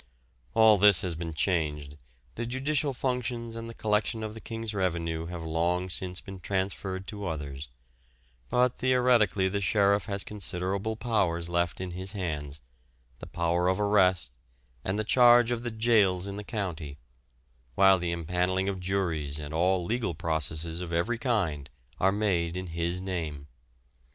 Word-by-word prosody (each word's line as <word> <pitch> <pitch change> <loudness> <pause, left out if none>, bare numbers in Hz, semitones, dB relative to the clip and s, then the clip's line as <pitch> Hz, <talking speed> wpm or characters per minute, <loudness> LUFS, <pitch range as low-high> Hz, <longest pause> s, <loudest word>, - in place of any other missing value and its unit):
All 110 -2 +6
this 100 -3 +7
has 90 -2 -1
been 80 -1 -5
changed, 75 -5 -1 0.4
the 120 0 -4
judicial 140 +3 0
functions 125 -3 -2
and 115 0 -6
the 115 - -9
collection 110 +1 0
of 110 -1 -4
the 110 - -9
King's 115 -1 -4
revenue 85 -4 -1
have 85 -1 -6
long 85 +3 0
since 90 0 -2
been 95 -1 -9
transferred 95 0 -3
to 105 -2 -6
others; 70 -4 -5 0.8
but 125 0 +2
theoretically 125 -7 +3
the 100 +1 -2
sheriff 100 +1 +2
has 100 -1 -3
considerable 100 +1 -3
powers 95 -8 0
left 85 -1 0
in 95 -1 -4
his 95 +3 -4
hands 75 -7 -4 0.6
the - - -9
power 85 +1 0
of 95 +1 +1
arrest 95 -8 +3 0.5
and 95 +2 -1
the 110 - 0
charge 120 +1 +6
of 120 -1 -1
the 120 - -2
jails 110 -5 +2
in 100 0 -5
the 105 - -6
county, 85 - -4 0.8
while 95 -1 +6
the 85 -1 -2
empanelling 90 +3 0
of 95 -1 -2
juries 85 -6 -1
and 75 0 -7
all 90 +2 +2
legal 110 -4 -1
processes 80 +1 -1
of 90 -2 -5
every 105 +8 0
kind 90 - -1 0.3
are 95 - +4
made 90 -5 0
in 95 - -4
his 85 +1 -2
name. 80 -7 -4
95 Hz, 155 wpm, -28 LUFS, 85-110 Hz, 0.8 s, this